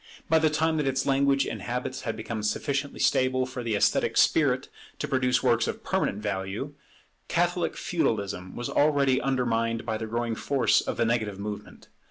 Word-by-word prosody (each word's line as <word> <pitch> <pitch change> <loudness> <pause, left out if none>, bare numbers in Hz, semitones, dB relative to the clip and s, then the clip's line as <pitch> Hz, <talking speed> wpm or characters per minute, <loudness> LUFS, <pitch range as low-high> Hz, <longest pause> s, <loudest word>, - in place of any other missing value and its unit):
By 160 0 +4
the 160 0 +3
time 160 +1 +1
that 150 -2 0
its 135 0 0
language 140 0 +3
and 110 - -5
habits 125 +3 -3
had 115 - -4
become 110 0 -4
sufficiently 140 +7 -2
stable 130 0 +2
for 130 -1 -6
the 115 -3 -1
esthetic 100 - +2
spirit - - +3 0.3
to - - -3
produce 125 -1 +1
works - - +3
of - - -4
permanent 105 +2 -1
value, 100 +7 -3 0.5
Catholic - - 0
Feudalism 95 -4 -2
was 120 - -4
already 140 -3 +3
undermined 115 -3 0
by 110 -1 -2
the 110 - -4
growing 115 +1 -2
force 135 +4 +2
of - - -4
the 115 - +2
negative 110 -4 -1
movement. 105 0 -7
120 Hz, 175 wpm, -27 LUFS, 110-135 Hz, 0.5 s, By